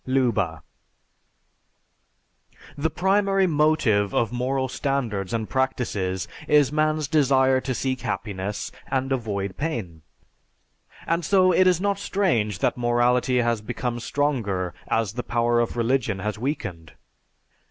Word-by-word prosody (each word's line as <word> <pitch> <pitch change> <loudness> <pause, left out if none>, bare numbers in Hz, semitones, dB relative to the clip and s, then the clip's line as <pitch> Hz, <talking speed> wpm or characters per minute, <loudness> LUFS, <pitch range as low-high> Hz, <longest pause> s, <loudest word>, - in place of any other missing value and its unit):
(Leuba.) 115 - 0 2.1
The 150 +2 0
primary 195 +2 +2
motive 150 - +2
of 115 - +1
moral 130 +2 -1
standards 125 -8 -2
and 110 -2 -2
practices 100 -9 -1 0.2
is 145 -2 +4
man's 155 -1 +1
desire 130 -3 +3
to 130 -1 -3
seek 130 0 -2
happiness 100 -2 -4 0.2
and 135 0 -1
avoid 100 -6 -2
pain. 110 - -4 1.0
And 165 +1 0
so 185 +2 +4
it 185 +1 +4
is 180 -2 +3
not 200 0 0
strange 160 - 0
that - - 0
morality 120 +1 +2
has 120 -2 0
become 120 +2 -3
stronger 115 -10 -1
as 110 -3 0
the 125 - -3
power 120 0 +1
of 120 0 -1
religion 115 -3 +1
has 105 +2 -3
weakened. 100 - -4
125 Hz, 120 wpm, -24 LUFS, 105-145 Hz, 2.1 s, is